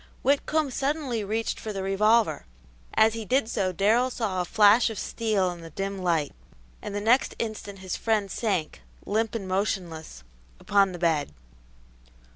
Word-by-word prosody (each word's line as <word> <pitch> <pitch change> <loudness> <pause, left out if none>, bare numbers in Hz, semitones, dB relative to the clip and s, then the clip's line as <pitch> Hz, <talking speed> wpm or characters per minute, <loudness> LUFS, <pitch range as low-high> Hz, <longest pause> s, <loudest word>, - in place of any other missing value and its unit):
Whitcomb 285 +1 +1
suddenly 270 -4 -1
reached 220 +3 -2
for 220 - -5
the 195 -2 -4
revolver; 210 - +2 0.5
as 220 0 +5
he 225 -1 -4
did 250 +2 +1
so 195 -5 -1
Darrell 220 +8 +2
saw 210 -7 -2
a - - -2
flash 210 +5 +5
of 220 - -6
steel 205 -4 0
in 175 -1 -9
the 165 - -9
dim 195 +4 -4
light, 165 -5 +1 0.5
and 205 - -6
the - - 0
next 230 +5 +2
instant 215 -3 -5
his 185 - -2
friend 215 -4 0
sank, 180 - -2 0.2
limp 225 +2 -1
and 200 -4 -4
motionless, 180 - -3 0.4
upon 200 -2 +3
the - - -6
bed. 160 - 0
205 Hz, 160 wpm, -26 LUFS, 185-225 Hz, 0.5 s, as